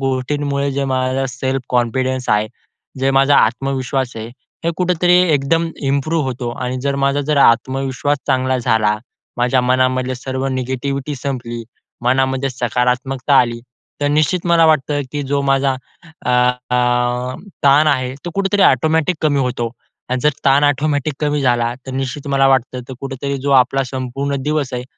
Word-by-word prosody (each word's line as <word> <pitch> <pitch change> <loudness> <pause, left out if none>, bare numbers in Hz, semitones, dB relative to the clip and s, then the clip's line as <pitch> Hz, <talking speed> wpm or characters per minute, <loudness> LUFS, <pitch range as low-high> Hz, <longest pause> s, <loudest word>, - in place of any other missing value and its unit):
गोष्टींमुळे 140 +2 -1
जे 140 0 -1
माझा 130 0 0
सेल्फ 130 +1 -2
कॉन्फिडन्स 130 +1 0
आहे. 105 +1 +2 0.5
जे 135 +1 +2
माझा 135 +1 +4
आत्मविश्वास 130 +2 0
आहे. 110 - -5 0.4
हे 170 - +2
कुठेतरी 180 -1 +2 0.2
एकदम 165 +4 +1 0.2
इम्प्रूव्ह 150 +2 0
होतो 125 -2 -3
आणि 125 0 -3
जर 140 0 0
माझा 140 +1 +1
जर 150 +1 -1
आत्मविश्वास 135 +3 +2
चांगला 130 -1 +1
झाला, 110 -3 +1 0.4
माझ्या 125 +1 +2
मनामधले 130 0 +1
सर्व 130 +1 -4
निगेटिव्हिटी 130 +2 -3
संपली, 120 -4 -4 0.4
मनामध्ये 130 +2 +1
सकारात्मकता 125 +2 0
आली 120 -1 -2 0.4
तर 145 - +1
निश्चित 155 +4 +1
मला 170 -1 +4
वाटतं, 145 -1 +2
की 145 -1 -2
जो 140 +1 -1
माझा 135 0 +2 0.5
अ, 125 - +2
अ, 125 0 +1 0.3
ताण 145 +2 +5
आहे 130 -3 +1
तो, 175 - -4
कुठेतरी 200 0 +1
ॲटोमॅटिक 160 +6 +3
कमी 145 -2 +2
होतो 120 -2 -2 0.4
आणि 130 0 -1
जर 150 - +4
ताण 140 +1 +4
ॲटोमॅटिक 145 0 +1
कमी 150 -1 0
झाला 120 -1 +1
तर - - -5
निश्चित 135 +2 -4
मला 135 0 +3
वाटतं 130 -1 +1
तो 130 - -6
कुठेतरी 140 0 -4
जो 140 - -1
आपला 135 +1 +4
संपूर्ण 135 +2 -3
दिवस 150 -2 -1
आहे, 125 0 -4
135 Hz, 150 wpm, -18 LUFS, 125-140 Hz, 0.5 s, ताण